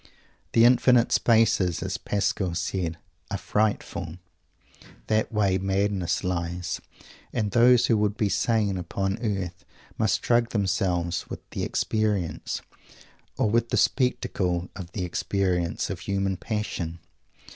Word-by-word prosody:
The 115 0 +6
infinite 125 -1 +5
spaces, 110 -7 +3
as - - -3
Pascal 100 -3 -1
said, 85 -1 -2 0.3
are 100 - -2
"frightful." 105 -5 -1 0.9
That 110 0 +1
way 100 -3 +2
madness 95 -2 0
lies. 90 -1 -2 0.5
And 105 -3 -1
those 120 +2 +6
who 115 - +3
would 105 0 0
be 105 - +2
sane 105 -2 +1
upon 95 +3 -2
earth 95 -5 -3 0.4
must 100 -4 +1
drug 120 -1 +3
themselves 95 -4 0
with - - -8
the - - -4
experience, 105 -6 -1 0.7
or 105 - +2
with 115 +1 +2
the - - 0
spectacle 90 -9 0
of 90 -3 -8
the 95 -5 -2
experience, 90 -1 -1
of 95 - -5
human 95 +1 -1
passion. 95 -5 -3
100 Hz, 125 wpm, -26 LUFS, 90-110 Hz, 0.9 s, The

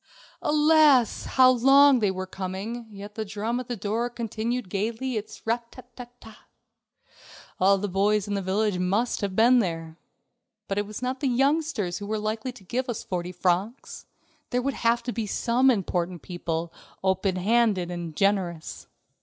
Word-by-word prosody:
Alas! 300 -4 +4
how 255 -1 +5
long 270 +2 +6
they 210 -3 +2
were 185 0 -3
coming, 190 +4 -5
and 220 -4 -12
yet 205 +1 -9
the 220 - -3
drum 215 +3 -3
at 250 - -7
the 245 - -3
door 220 +5 -1
continued 235 0 -3
gayly 225 +7 -2
its 215 -1 -6
rat 235 +1 -2
ta 255 - -12
ta 245 -1 -8
ta. 220 -1 -15 1.1
All 195 +2 +5
the 205 +2 -2
boys 200 +2 +1
in 205 - -2
the 200 - -1
village 195 0 0
must 200 +8 0
have 200 -2 -2
been 245 +4 +5
there. 165 -5 -3 0.7
But 195 +1 -1
it 205 - -2
was 215 +4 -7
not 255 +1 -2
the 280 - 0
youngsters 270 - 0
who 205 - -7
were 215 +1 -1
likely 220 +4 -3
to 245 -5 -16
give 250 +7 -3
us 235 - -3
forty 180 -1 -4
francs. 185 +7 -2 0.4
There 250 0 0
would 275 +1 -1
have 235 0 +1
to 245 - -3
be 225 -2 -3
some 245 +5 +2
important 180 - -1
people, 170 -2 -4 0.3
open 190 0 +1
handed 200 -2 +1
and 170 -3 -6
generous. 185 -4 -1
215 Hz, 175 wpm, -26 LUFS, 190-245 Hz, 1.1 s, long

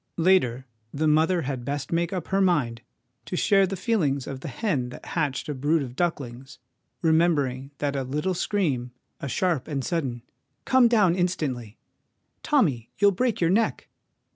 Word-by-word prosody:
Later, 160 -9 +3 0.3
the 155 +2 0
mother 160 +3 +3
had 130 -2 -4
best 140 +2 -4
make 170 +2 0
up 185 -4 -4
her 195 +1 +2
mind 140 -11 +1 0.4
to - - -4
share 195 +1 +4
the 195 - -3
feelings 170 - 0
of 135 - -6
the 145 - -7
hen 140 - -1
that - - -11
hatched 145 -6 -2
a 150 - -2
brood 145 +3 +1
of 125 -2 -8
ducklings, 135 -6 -3 0.5
remembering 150 -5 +2
that 145 -1 -2
a 135 - 0
little 150 +8 -1
scream, 145 -11 -1 0.3
a - - -5
sharp 170 0 0
and 140 -4 -3
sudden 130 -9 -2 0.2
' - - -49
Come 260 -2 +5
down 210 -7 +4
instantly! 145 - -2 0.2
' - - -50
' - - -49
Tommy, 145 - +1
you'll 200 0 +5
break 230 +3 0
your 170 -1 +2
neck!' 220 +3 0
155 Hz, 175 wpm, -25 LUFS, 130-185 Hz, 0.5 s, Come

